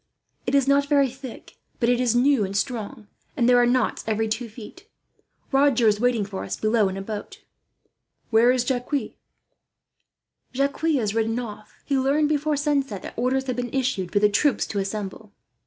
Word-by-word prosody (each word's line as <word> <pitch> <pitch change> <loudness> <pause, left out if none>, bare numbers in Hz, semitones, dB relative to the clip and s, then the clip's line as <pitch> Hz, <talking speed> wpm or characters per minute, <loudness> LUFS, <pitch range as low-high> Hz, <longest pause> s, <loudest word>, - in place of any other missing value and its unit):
It - - +1
is 275 -1 +3
not 280 0 +3
very 280 -3 +3
thick, 265 -1 -11 0.2
but 235 - +1
it 245 0 +3
is 240 -2 +2
new 255 -1 +3
and 195 0 -2
strong, 225 0 -3 0.3
and 235 - +3
there 245 0 +6
are 240 - +4
knots 250 -1 +1
every 220 0 0
two 225 +2 -3
feet. 240 - -12 0.6
Roger 270 -4 +3
is 210 -1 +3
waiting 240 -3 +1
for 195 -1 -6
us - - -4
below, 215 -2 +2
in 190 - -5
a 195 - -5
boat." 210 0 -7 0.9
"Where 230 +2 +5
is 250 -1 +1
Jacques?" 260 +2 -2 1.4
"Jacques 275 +2 -1
has 275 -11 +1
ridden 225 +1 0
off. 215 -3 -7
He 275 -2 +1
learned, 290 +3 +2
before 300 0 0
sunset, 275 -8 -1
that - - -7
orders 260 +3 0
had 255 -2 -2
been 245 0 -3
issued 255 -9 -1
for - - 0
the 210 +1 +5
troops 240 +7 +1
to 205 - -3
assemble. 200 +1 -5
245 Hz, 185 wpm, -24 LUFS, 215-275 Hz, 1.4 s, there